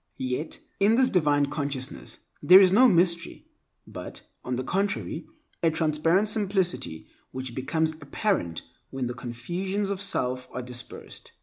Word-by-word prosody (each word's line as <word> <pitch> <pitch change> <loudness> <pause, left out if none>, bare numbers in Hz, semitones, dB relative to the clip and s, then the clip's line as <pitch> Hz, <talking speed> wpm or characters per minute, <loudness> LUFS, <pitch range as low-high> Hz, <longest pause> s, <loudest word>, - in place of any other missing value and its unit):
Yet, 130 +5 -4 0.2
in 205 +3 +4
this 255 +1 +3
divine 145 -5 +3
consciousness 140 -2 -4 0.2
there 185 +2 +9
is 190 -2 +6
no 250 +7 +7
mystery, 170 -4 +1 0.4
but, - - -9 0.2
on 125 - -2
the 130 - -3
contrary, 195 - -2 0.3
a 165 - +4
transparent 160 +5 +1
simplicity 190 - -1 0.2
which 130 -2 -6
becomes 160 +5 0
apparent 145 - -1 0.3
when 135 -1 -3
the 120 - -3
confusions 175 - -3
of 195 -1 -3
self 130 -9 -1
are 125 - -4
dispersed. 125 0 -6
160 Hz, 135 wpm, -26 LUFS, 130-195 Hz, 0.4 s, there